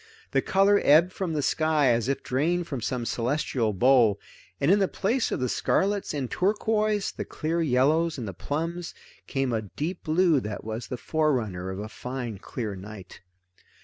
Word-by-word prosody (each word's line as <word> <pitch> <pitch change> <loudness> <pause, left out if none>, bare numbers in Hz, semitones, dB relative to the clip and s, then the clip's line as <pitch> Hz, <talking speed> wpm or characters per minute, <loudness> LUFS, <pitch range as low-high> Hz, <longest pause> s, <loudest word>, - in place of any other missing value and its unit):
The - - +2
color 200 +1 +3
ebbed 165 +5 +5
from 180 -4 -3
the 150 -2 -1
sky 155 -2 +2
as 120 0 +1
if 140 -1 -1
drained 170 +7 0
from 135 -6 -5
some 120 +1 -2
celestial 120 -2 0
bowl, 115 -1 +4 0.4
and 140 +5 +3
in 205 - +5
the 195 - +3
place 230 +8 0
of - - -1
the 125 - 0
scarlets 200 - 0
and 140 -4 -2
turquoise, 210 - 0
the - - -5
clear 165 +2 -2
yellows 155 +4 +2
and 120 -4 -5
the 95 - -5
plums, 165 - -4 0.3
came 135 -3 -1
a 110 - 0
deep 150 - -5
blue 165 -1 +3
that 105 -3 -6
was 110 +1 -5
the 125 - -4
forerunner 120 - -1
of 95 - -5
a 105 +2 -5
fine 125 -2 -6
clear 105 -1 -5
night. 100 0 -10
140 Hz, 180 wpm, -26 LUFS, 115-170 Hz, 0.4 s, ebbed